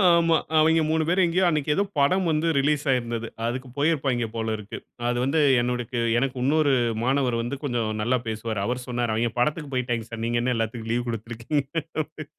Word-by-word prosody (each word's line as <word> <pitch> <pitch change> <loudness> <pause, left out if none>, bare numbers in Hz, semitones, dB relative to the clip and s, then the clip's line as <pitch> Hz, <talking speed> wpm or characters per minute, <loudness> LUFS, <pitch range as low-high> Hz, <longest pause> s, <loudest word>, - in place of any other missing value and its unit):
ஆமா. 165 -1 +4 0.2
அவங்க 160 +1 +4
3 160 0 +2
பேரும் 180 +1 +3
எங்கேயோ 180 +2 +2
அன்னைக்கு 150 -2 -1
ஏதோ 200 - +2 0.2
படம் 185 +7 +3
வந்து 155 +2 +1
ரிலீஸ் 145 +1 +2
ஆயிருந்தது. 120 -2 -1 0.2
அதுக்கு 130 +2 -3
போயிருப்பாங்கே 135 -6 +1
போலருக்கு. 110 -2 -3 0.3
அது 120 0 0
வந்து 145 +4 +1 0.2
என்னுடக்கு 125 0 -2 0.2
எனக்கு 130 0 0
இன்னொரு 145 0 +3 0.3
மாணவர் 130 -2 +1
வந்து 120 +4 -3
கொஞ்சம் 120 -5 -1
நல்லா 125 +4 +2
பேசுவாரு, 110 -1 -3
அவர் 125 +1 -2
சொன்னாரு. 120 -2 -1
அவங்க 115 +1 0
படத்துக்கு 145 +3 0
போய்ட்டாங்க 120 -3 -1
சார், 115 -1 -6
நீங்க 120 0 0
என்ன 125 0 +1
எல்லாத்துக்கும் 115 0 -3
லீவ் 120 +1 -1
குடுத்திருக்கிறீங்கன்ற 120 +7 -3 0.2
மாரி. 155 0 -9
125 Hz, 175 wpm, -25 LUFS, 115-150 Hz, 0.3 s, ஆமா